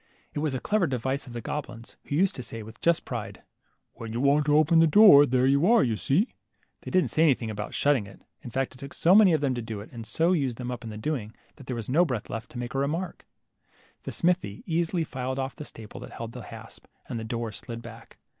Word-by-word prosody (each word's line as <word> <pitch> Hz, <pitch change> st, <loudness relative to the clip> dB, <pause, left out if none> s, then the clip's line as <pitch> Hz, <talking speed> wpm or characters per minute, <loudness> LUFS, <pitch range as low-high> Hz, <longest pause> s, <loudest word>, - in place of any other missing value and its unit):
It -, -, -3 dB
was 150 Hz, -3 st, -1 dB
a -, -, -2 dB
clever 205 Hz, -, +1 dB
device 130 Hz, +2 st, -2 dB
of 120 Hz, -, -9 dB
the 120 Hz, -, -5 dB
goblins, 120 Hz, -5 st, -6 dB
who 145 Hz, -, -3 dB
used 185 Hz, +4 st, +3 dB
to -, -, -6 dB
say 115 Hz, -2 st, -7 dB
with 110 Hz, +1 st, -13 dB
just 170 Hz, -1 st, +2 dB
pride, 105 Hz, -6 st, -6 dB, 0.5 s
When 115 Hz, -1 st, -8 dB
you 115 Hz, -, -2 dB
want 140 Hz, +2 st, +3 dB
to 150 Hz, 0 st, +5 dB
open 160 Hz, +2 st, +5 dB
the 165 Hz, -, +6 dB
door, 155 Hz, -5 st, +8 dB
there 130 Hz, 0 st, +2 dB
you 140 Hz, -, +4 dB
are, 235 Hz, -2 st, +6 dB
you 115 Hz, -3 st, 0 dB
see! 165 Hz, -, +1 dB, 0.2 s
" -, -, -42 dB
They -, -, -7 dB
didn't 185 Hz, -1 st, +2 dB
say 155 Hz, -, +1 dB
anything 130 Hz, -8 st, +3 dB
about 105 Hz, 0 st, -5 dB
shutting 140 Hz, -8 st, +2 dB
it. 95 Hz, -, -15 dB, 0.2 s
In 125 Hz, -, -8 dB
fact 135 Hz, +2 st, -2 dB
it 130 Hz, -, -16 dB
took 140 Hz, +1 st, -9 dB
so 175 Hz, -, +4 dB
many 205 Hz, -2 st, +7 dB
of 155 Hz, -3 st, +2 dB
them 140 Hz, -3 st, +1 dB
to 120 Hz, -, -3 dB
do 110 Hz, -2 st, -6 dB
it, 100 Hz, -, -11 dB
and 115 Hz, -2 st, -7 dB
so 165 Hz, +2 st, +2 dB
used 135 Hz, -9 st, 0 dB
them 125 Hz, -1 st, -4 dB
up 125 Hz, -1 st, -6 dB
in 115 Hz, -, -6 dB
the 105 Hz, -, -7 dB
doing, 110 Hz, -3 st, -3 dB, 0.2 s
that 135 Hz, -3 st, -14 dB
there 125 Hz, -, -3 dB
was 115 Hz, -2 st, -5 dB
no 155 Hz, +7 st, +4 dB
breath 125 Hz, -, -3 dB
left 115 Hz, +1 st, -5 dB
to -, -, -10 dB
make 120 Hz, 0 st, -5 dB
a 135 Hz, -, 0 dB
remark. 160 Hz, +6 st, -3 dB, 0.7 s
The -, -, -6 dB
smith 180 Hz, +1 st, +1 dB
easily 165 Hz, -, -2 dB
filed 130 Hz, -3 st, -4 dB
off 135 Hz, 0 st, -3 dB
the 150 Hz, -, -8 dB
staple 110 Hz, -6 st, -10 dB
that -, -, -10 dB
held 115 Hz, 0 st, -6 dB
the -, -, -8 dB
hasp, -, -, -11 dB, 0.2 s
and 115 Hz, -, -4 dB
the -, -, -5 dB
door 115 Hz, 0 st, -3 dB
slid 115 Hz, +3 st, -7 dB
back. 115 Hz, 0 st, -12 dB
130 Hz, 260 wpm, -27 LUFS, 115-155 Hz, 0.7 s, door